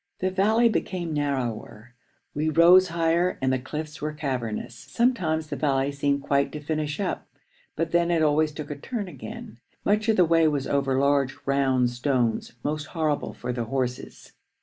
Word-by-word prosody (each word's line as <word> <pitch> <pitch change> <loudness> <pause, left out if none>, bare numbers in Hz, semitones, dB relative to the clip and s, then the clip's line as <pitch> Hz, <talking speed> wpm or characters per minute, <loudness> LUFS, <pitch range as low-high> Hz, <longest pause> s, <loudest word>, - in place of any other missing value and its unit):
The 185 0 -1
valley 215 +5 +3
became 180 -6 -2
narrower, 120 -5 -3 0.4
we 155 +2 0
rose 175 +4 +6
higher, 170 +1 +1
and 130 0 +1
the 130 - 0
cliffs 155 +4 -6
were 150 0 -2
cavernous. 125 -7 -3
Sometimes 170 - 0
the - - -1
valley 135 -1 +1
seemed 140 0 0
quite 140 0 +1
to 150 - -4
finish 150 0 -3
up, 200 - -3 0.5
but 165 0 -2
then 170 0 +2
it 165 -2 +2
always 155 +1 +2
took 150 0 -7
a - - -3
turn 205 - -5
again. 120 -6 -9 0.3
Much 210 +2 +2
of 220 - +4
the 180 - +6
way 165 -1 +4
was 145 -3 0
over 135 -2 0
large, 140 -1 +2
round 130 -3 +2
stones, 120 -2 -1
most 150 0 -2
horrible 155 -2 -1
for 125 0 -4
the 120 -1 -3
horses. 125 0 -4
150 Hz, 170 wpm, -25 LUFS, 135-165 Hz, 0.5 s, rose